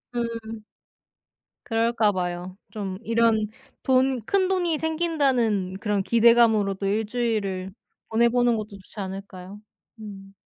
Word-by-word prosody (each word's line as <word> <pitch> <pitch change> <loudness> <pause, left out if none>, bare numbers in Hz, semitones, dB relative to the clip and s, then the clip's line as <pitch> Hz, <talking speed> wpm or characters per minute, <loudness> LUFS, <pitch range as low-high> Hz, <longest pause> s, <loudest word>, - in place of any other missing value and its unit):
음. 230 -2 -4 1.0
그럴까 225 -1 +2
봐요. 180 0 -4
좀 195 -3 -5
이런 230 -1 +2 0.4
돈 260 -1 +2
큰돈이 370 -3 +1
생긴다는 275 - 0
그런 205 -2 -1
기대감으로 230 -3 +4
또 195 - -5
1 215 +3 0
주일을 210 -5 -2 0.4
보내 235 +1 +3
보는 245 -1 +2
것도 215 -1 -5
좋지 195 +2 -13
않을까요? 195 0 -7 0.4
음. 195 -2 -10
220 Hz, 235 characters per minute, -24 LUFS, 195-240 Hz, 1.0 s, 기대감으로